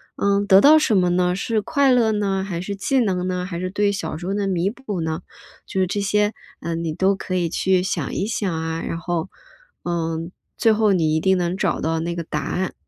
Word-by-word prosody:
嗯， 200 0 +1
得 190 +1 +7
到 310 +2 +7
什 225 -8 +2
么 180 -1 +3
呢？ 180 0 +2
是 215 +2 -1
快 280 +2 +2
乐 235 -3 +4
呢？ 195 -2 0
还 180 -4 -4
是 200 +3 -4
技 260 +7 0
能 185 -5 0
呢？ 180 -1 -2
还 175 -2 -5
是 185 0 -3
对 205 +1 +1
小 195 -5 -4
时 175 - -8
候 195 - -1
的 200 -1 -1
弥 185 +1 0
补 220 -8 -5
呢？ 160 0 -2 0.5
就 190 - -3
是 185 - +3
这 200 +3 -2
些， 210 +1 +1 0.3
嗯， 170 0 -3
你 160 - -2
都 190 +4 +2
可 185 -1 -4
以 175 -2 +1
去 185 +2 +1
想 190 - -2
一 190 - -1
想 210 -3 -2
啊， 160 0 -3
然 165 - -4
后， 175 +1 -3 0.5
嗯， 165 0 -2 0.3
最 225 -2 +4
后 215 -1 +3
你 160 -3 +2
一 160 - +2
定 190 +2 +2
能 175 0 -1
找 195 -3 0
到 160 +1 0
那 170 +1 -3
个 170 - -3
答 150 -2 -3
案。 185 +6 -2
185 Hz, 250 characters per minute, -22 LUFS, 170-205 Hz, 0.5 s, 得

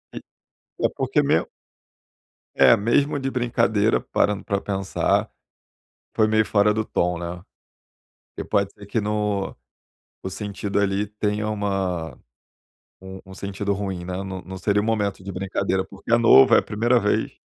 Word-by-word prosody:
E - - -4 0.7
é - - +3
porque - - +1
mesmo - - +2 1.1
É, - - +7
mesmo 140 +7 +1
de 135 0 -2
brincadeira, 115 -4 +1
parando 105 -1 0
para 100 -2 -1
pensar, 95 -1 -1 0.9
foi 110 - +3
meio 110 0 +3
fora 105 0 +3
do 110 +1 -1
tom, 90 -4 -1
né. 85 +1 -6 0.9
E - - -4
pode 100 -2 0
ser 100 - -14
que 105 +3 -1
no 105 -1 -1 0.7
no 95 - -3
sentido 100 0 -3
ali 100 0 +1
tenha 105 0 -2
uma 95 -6 -2 0.9
um 95 0 -9
um 95 - -11
sentido 100 +1 -3
ruim, 95 -3 -4
né. 90 0 -4
Não 95 -1 -6
não 95 0 -8
seria 105 +1 +1
o - - -3
momento 105 -4 -1
de 100 - -7
brincadeira, 95 0 -1
porque - - -8
é - - +7
novo, 115 - +7
é - - +7
a - - +2
primeira 120 +4 +1
vez 105 -2 0
100 Hz, 160 wpm, -23 LUFS, 95-105 Hz, 1.1 s, É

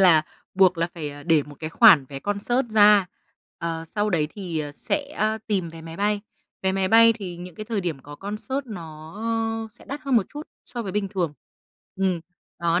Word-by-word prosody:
là 165 -5 +7 0.3
buộc 185 -2 +5
là 170 - +2
phải, 150 -3 -4
à, 145 0 -10
để 160 -2 +3
một 145 0 -12
cái 155 0 -4
khoản 180 - +7
vé 135 -1 -6
concert 240 +5 0
ra. 210 -3 +6 0.5
Ờ, 165 -1 -3
sau 205 +5 -1
đấy 155 -4 +2
thì, 180 -6 -4
ờ, 145 -1 -4
sẽ 285 - -3 0.3
tìm 190 -6 0
vé 165 0 -10
máy 165 0 -9
bay. 205 0 +1 0.4
Vé 190 0 +2
máy 190 -1 +1
bay 230 0 +7
thì 190 -6 -7
những 175 -1 -9
cái 215 - -6
thời 215 -3 -1
điểm 165 -6 -2
có 145 0 -10
concert 235 +7 -4
nó, 160 -6 -9 0.5
ơ, - - -6
sẽ - - -10
đắt 280 +2 -6
hơn 270 -4 +2
một 195 - +3
chút 295 +1 -7 0.2
so 240 -1 -5
với 190 -3 -5
bình 205 -1 -1
thường. 180 -7 -1 0.6
Ừm. 190 -3 +1 0.4
Đó, 170 +1 +2
185 Hz, 210 wpm, -24 LUFS, 165-210 Hz, 0.6 s, là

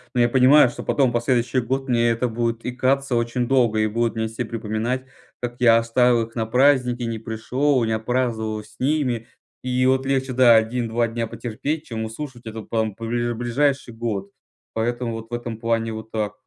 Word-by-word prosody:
Ну, 120 - +3
я 120 - +4
понимаю, 130 +1 +6
что - - -8
потом 135 -4 +2
последующий 120 +1 +1
год 135 +3 -2
мне 120 -1 +2
это 115 +2 0
будет 115 0 -2
икаться 130 +1 0
очень 120 +1 0
долго, 120 -5 +2
и 110 - +2
будут 115 +2 -1
мне 110 0 -1
все 110 +2 -4
припоминать, 115 +3 -3 0.3
как 120 0 -5
я 115 -2 +6
оставил 115 +1 +3
их 115 +1 -18
на 110 -1 -1
праздники, 125 -1 +3
не 115 -1 -3
пришел, 125 +4 0
не 110 - -1
отпраздновал 110 -1 -1
с 105 - -20
ними 130 -5 0 0.4
и, 125 0 +1
вот, 130 +1 +2
легче, 135 -1 0
да, 120 -2 +6
1-2 115 +1 +1
дня 115 0 -3
потерпеть, 145 +8 -4
чем 110 -2 -4
выслушивать 120 +1 -7
это 110 0 -6
потом 110 -2 -2
бли 120 +1 -2
ближайший 120 +2 0
год. 105 -4 -4 0.4
Поэтому 120 +1 -2
вот 115 0 -7
в 120 - -11
этом 120 -2 -4
плане 115 -1 -1
вот 110 0 -8
так. 105 -2 -2
120 Hz, 185 wpm, -22 LUFS, 115-125 Hz, 0.4 s, понимаю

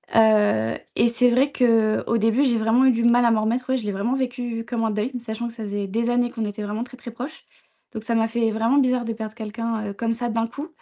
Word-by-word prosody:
heu, 210 - +4 0.2
et 230 - +4
c'est 245 +1 +3
vrai 270 +4 +2
qu'au 230 -3 +2
début 225 +5 +2
j'ai 235 -3 +2
vraiment 225 +4 +3
eu 260 - +6
du 230 0 -1
mal 240 0 +4
à 235 - +4
m'en 220 -1 +2
remettre, 235 +4 -1
oui, 260 - +2
je 225 - -6
l'ai 205 - 0
vraiment 205 +6 -1
vécu 245 -3 -3
comme 235 -1 -2
un 220 - +1
deuil, 215 +5 -2
sachant 235 0 -5
que 230 - -8
ça 225 -2 -8
faisait 205 -1 -3
des 230 +4 -1
années 245 0 +1
qu'on 230 -3 -4
était 205 0 -5
vraiment 210 +3 -3
très, 250 - -12
très 245 - -10
proches, 250 +7 -8 0.5
donc 220 -2 -7
ça 230 - -2
m'a 225 0 +2
fait 225 -1 0
vraiment 225 +5 +1
bizarre 255 -2 +2
de 230 0 -3
perdre 220 -1 -6
quelqu'un, 225 0 -4
heu, - - -5
comme 230 +3 -1
ça, 240 +1 -3
d'un 225 0 0
coup, 280 +7 -7
230 Hz, 265 wpm, -23 LUFS, 220-245 Hz, 0.5 s, eu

